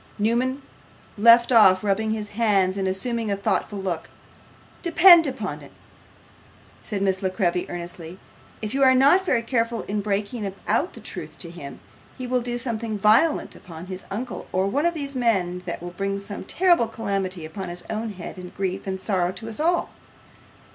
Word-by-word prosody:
Newman 245 +6 0 0.5
left 235 +3 +6
off 190 -5 +6
rubbing 210 +2 0
his 215 -1 -3
hands, 200 -4 +2
and 195 -1 -1
assumed 225 +4 -2
a 200 - +1
thoughtful 200 +1 -1
look. 185 -4 -4 0.7
'Depend 345 -1 +7
upon 265 -1 -4
it,' - - -13 1.1
said 200 -2 -3
Miss 190 -1 +1
La 190 - 0
Creevy, 180 -2 -1
earnestly, 175 0 -7 0.5
'if 215 - -3
you 275 - 0
are 260 -1 +6
not 285 +9 +5
very 250 -11 +1
careful 230 -1 -1
in 205 +1 -2
breaking 205 +1 -2 0.2
out - - +1
the - - -10
truth - - -7
to - - -4
him, - - -9 0.4
he 255 - -5
will 250 0 0
do 240 0 -3
some 235 -2 -3
violence 220 +7 +2
upon 165 -1 -10
his 185 0 -6
uncle 235 +5 -5
or 185 +1 +1
one 285 +12 +1
of 345 - -1
these 280 -3 -4
men 190 -8 +1
that 170 0 -5
will 175 - -6
bring 195 +2 -2
some 200 +1 -7
terrible 350 -10 +3
calamity 195 -6 -3
upon 180 +4 -6
his 175 0 -7
own 220 0 -3
head, 180 -1 -8
and 180 -1 -10
grief 190 0 -3
and 190 0 -3
sorrow 185 -3 0
to 190 +4 -8
us 225 +2 -4
all. 340 +3 +1
210 Hz, 180 wpm, -24 LUFS, 190-240 Hz, 1.1 s, Depend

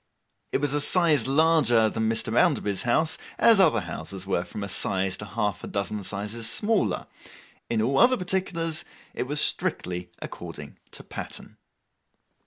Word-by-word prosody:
It - - 0
was 145 -1 0
a 145 - 0
size 150 -5 +4
larger 140 -6 +3
than 110 0 -1
Mr. 115 0 0
Bounderby's 120 - +2
house, 155 +7 +1 0.2
as 230 -3 +6
other 155 - +4
houses 90 +2 -7
were 90 -2 -1
from 100 +3 -7
a - - -4
size 95 0 0
to 105 - -6
half 105 0 -3
a - - -6
dozen 100 +1 -3
sizes 105 +4 -2
smaller; 205 - 0 0.6
in 110 -2 0
all 135 +4 +1
other 255 +1 +5
particulars, 175 -3 -1 0.3
it 125 - -4
was 145 +2 -1
strictly 90 -9 0
according 80 -4 -9
to - - -9
pattern. - - -7
115 Hz, 155 wpm, -25 LUFS, 100-160 Hz, 0.6 s, as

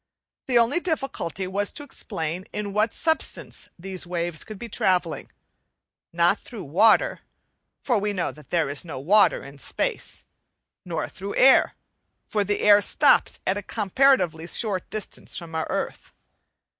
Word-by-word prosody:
The 250 -2 +3
only 235 +8 +4
difficulty 270 - -3
was 200 +2 -2
to 290 - -6
explain 180 - -4
in 205 -1 -4
what 215 +2 +2
substance 320 -1 -2
these 185 0 -5
waves 175 -2 -3
could 215 - -9
be 235 - -7
travelling: 180 -6 0 0.8
not 170 +4 +3
through 225 -6 -9
water, 220 - +3 0.6
for 240 -5 +2
we 205 +1 -1
know 185 -4 -2
that 150 - -16
there 170 -4 +1
is 140 +1 -5
no 160 -6 -7
water 200 +9 +4
in 140 +1 -12
space - - -4 0.6
nor 170 -3 -3
through 200 +2 -7
air, 265 +1 +5 0.5
for 210 -1 0
the 205 +1 -1
air 205 0 +7
stops - - +3
at 190 - +1
a - - -6
comparatively 200 - +2
short 200 -2 -1
distance 215 -2 -6
from 170 -1 -8
our 160 0 -2
earth. - - -4
195 Hz, 150 wpm, -24 LUFS, 170-220 Hz, 0.8 s, air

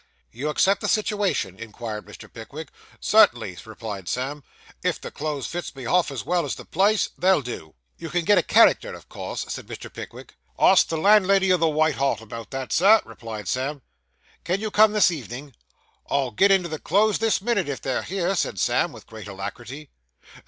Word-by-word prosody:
'You 140 +6 -4
accept 195 +6 +2
the - - -1
situation?' 205 - 0
inquired 110 -1 -7
Mr. - - -12
Pickwick. - - -9 0.3
'Cert'nly,' 90 -1 +3
replied 105 -5 -7
Sam. 135 +3 -3 0.4
'If - - 0
the - - -8
clothes 150 -3 -4
fits 175 -4 -5
me 135 - -8
half 175 +7 +2
as 135 -4 -6
well 175 -1 +1
as 145 - -3
the - - -11
place, 200 +4 +2
they'll 185 -5 +3
do.' 100 -10 -8 0.2
'You 165 - -6
can 175 0 -1
get 205 - +5
a - - +3
character - - +4
of - - -14
course?' - - -5
said - - -6
Mr. - - -9
Pickwick. - - -10 0.2
'Ask 190 - +5
the 165 - -2
landlady 195 0 +4
o' - - +4
the 165 -1 +2
White 155 -1 +1
Hart 140 0 +1
about 115 0 -9
that, 135 -1 -4
Sir,' 210 +5 +5
replied 110 -4 -8
Sam. 135 +4 -2 0.6
'Can 180 +3 -1
you 215 0 -4
come 215 0 +5
this 210 -4 +4
evening?' 135 -2 -7 0.6
'I'll 135 -3 0
get 200 +9 +4
into 190 -3 +3
the 155 -2 -5
clothes 205 +4 +2
this 225 -2 +2
minute, 205 -6 0
if 140 - -3
they're 130 -1 -2
here,' 190 0 -1
said 135 - -1
Sam, - - +1
with - - -13
great 110 -2 -10
alacrity. 120 +8 -8
155 Hz, 190 wpm, -24 LUFS, 120-190 Hz, 0.6 s, get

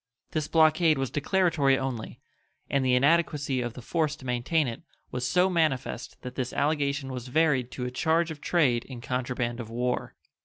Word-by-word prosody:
This 155 -1 -1
blockade 160 0 +4
was 135 -2 -2
declaratory 150 -4 +2
only, 130 -4 -4 0.5
and 140 -1 +2
the 130 -1 +3
inadequacy 145 -1 +2
of 120 -2 -3
the 125 - -10
force 155 +1 0
to 135 - -14
maintain 125 +5 +1
it 115 - -5 0.3
was 125 0 -2
so 180 +6 +3
manifest 155 -9 -1
that 125 - -6
this 130 -1 -3
allegation 140 -2 0
was 125 -1 -6
varied 135 -3 +2
to 125 - -4
a 125 - -3
charge 160 +5 +1
of 150 -2 -8
trade 135 -9 +2
in 130 -3 -8
contraband 125 -1 -2
of 115 -2 -6
war. 125 +2 -2
135 Hz, 180 wpm, -27 LUFS, 125-155 Hz, 0.5 s, blockade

